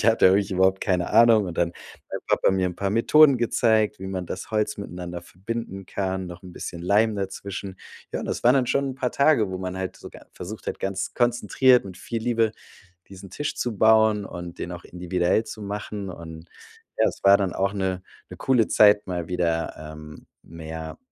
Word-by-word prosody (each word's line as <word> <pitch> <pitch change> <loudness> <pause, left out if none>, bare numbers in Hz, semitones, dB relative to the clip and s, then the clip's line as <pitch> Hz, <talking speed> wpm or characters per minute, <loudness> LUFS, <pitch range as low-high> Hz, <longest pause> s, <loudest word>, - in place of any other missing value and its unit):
Ich - - 0
hatte 115 -3 +5
ja 95 - +6
wirklich 100 0 +1
überhaupt 95 +1 +2
keine 90 -3 0
Ahnung, 115 -1 +6
und 85 - -6
dann 85 -1 +2
hat - - -15
mein - - -4
Papa - - +3
mir 95 -1 +1
'n 90 - -11
paar 100 - -1
Methoden 140 +6 +5
gezeigt, 110 -2 +2
wie 95 - -7
man 95 -1 -4
das 95 - -7
Holz 105 -1 -1
miteinander 90 -3 -6
verbinden 95 +1 -6
kann, 95 -1 -3
noch 90 0 -10
'n 90 - -11
bisschen 85 - -6
Leim 105 +4 +3
dazwischen. 95 0 -5 0.4
Ja, - - -2
und - - -5
das - - -3
waren 125 +2 +6
dann 130 -2 +2
schon 140 +2 0
'n - - -7
paar 125 -1 -2
Tage, 140 -8 +3
wo 95 - -4
man 95 0 -5
halt 95 -1 -4
so - - -10
ga - - -14
versucht 105 +5 -8
hat, - - -5
ganz 95 0 -3
konzentriert 120 +1 +3
mit 95 -2 -10
viel 115 +3 -5
Liebe 115 -2 +1 0.6
diesen 95 0 -11
Tisch 150 - -4
zu 120 -4 -3
bauen 110 -1 +4
und 85 -1 -8
den 90 - -4
auch 85 - -9
individuell 90 +4 0
zu 110 - -8
machen. 100 -1 -5
Und 80 -1 -10 0.5
ja, - - +5
es - - -6
war 100 0 +7
dann 95 -3 -1
auch 100 0 0
'ne 95 -2 -2 0.3
'ne - - -10
coole 125 -5 +2
Zeit, 105 -1 +5
mal 90 -3 -3
wieder, 85 -2 -1
ähm, 75 0 -11 0.2
mehr, 80 -1 -8
95 Hz, 210 wpm, -24 LUFS, 90-110 Hz, 0.6 s, war